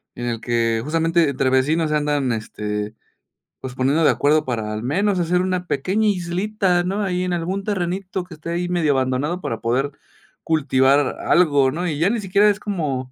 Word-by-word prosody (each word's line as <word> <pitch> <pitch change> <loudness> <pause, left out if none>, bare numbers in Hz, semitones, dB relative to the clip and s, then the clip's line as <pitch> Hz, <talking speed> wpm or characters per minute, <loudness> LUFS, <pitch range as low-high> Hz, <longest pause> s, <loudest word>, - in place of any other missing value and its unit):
en 120 - -5
el 115 -2 -3
que 115 -2 0
justamente, 165 +1 +1
entre 135 -1 0
vecinos 150 +5 +2
se 150 - +1
andan, 145 -4 0
este, 105 -1 -4 0.7
pues, 130 -1 -7
poniendo 135 +5 +1
de - - +6
acuerdo 150 +2 +2
para 110 -4 -3
al 105 - -4
menos 190 +9 +1
hacer 175 +1 +1
una 185 -1 -2
pequeña 190 +11 0
islita, 185 0 0
¿no?, 195 +3 -1
ahí 180 -2 -1
en 180 -1 -1
algún 180 +3 -2
terrenito 190 -1 -2
que 180 -1 -13
esté 155 +2 -8
ahí 175 +1 -2
medio 165 -5 +2
abandonado 135 +7 -1
para 115 - -3
poder 130 +5 0 0.5
cultivar 140 -3 +3
a 140 - -3
algo, 145 -6 +4
¿no?, 175 +5 -3
y 150 - -2
ya 175 - +3
ni 235 - -1
siquiera 200 +2 +3
es 205 - 0
como, 145 -11 -3
160 Hz, 190 wpm, -21 LUFS, 130-180 Hz, 0.7 s, de